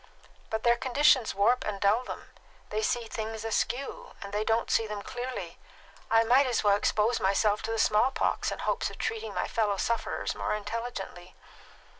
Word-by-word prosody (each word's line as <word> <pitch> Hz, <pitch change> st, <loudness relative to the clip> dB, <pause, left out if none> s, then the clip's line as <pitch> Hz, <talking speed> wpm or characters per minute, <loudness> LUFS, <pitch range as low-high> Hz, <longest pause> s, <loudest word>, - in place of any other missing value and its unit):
But 220 Hz, 0 st, -2 dB
their 235 Hz, 0 st, +4 dB
conditions 260 Hz, -1 st, +3 dB
warp 225 Hz, +6 st, +3 dB
and 205 Hz, -2 st, -3 dB
dull 205 Hz, +5 st, +3 dB
them; -, -, -8 dB, 0.4 s
they 215 Hz, +1 st, -1 dB
see 235 Hz, +2 st, 0 dB
things 220 Hz, 0 st, -5 dB
askew, 245 Hz, +4 st, -2 dB
and 200 Hz, 0 st, -9 dB
they 210 Hz, +1 st, 0 dB
don't 225 Hz, +1 st, 0 dB
see 225 Hz, -, +2 dB
them 210 Hz, -1 st, -5 dB
clearly. 250 Hz, +1 st, -6 dB, 0.5 s
I 225 Hz, 0 st, +5 dB
might 255 Hz, +4 st, +4 dB
as 245 Hz, -3 st, 0 dB
well 205 Hz, -1 st, +5 dB
expose 215 Hz, +3 st, +1 dB
myself 205 Hz, +2 st, +2 dB
to 225 Hz, -, -4 dB
the 225 Hz, -, -1 dB
small 215 Hz, +3 st, +3 dB
pox 270 Hz, -, -1 dB
in -, -, -4 dB
hopes -, -, -1 dB
of -, -, -11 dB
treating 450 Hz, 0 st, -3 dB
my -, -, -1 dB
fellow 210 Hz, -3 st, 0 dB
sufferers 230 Hz, +4 st, -1 dB
more -, -, -2 dB
intelligently." 205 Hz, -4 st, -6 dB
225 Hz, 180 wpm, -29 LUFS, 210-245 Hz, 0.5 s, I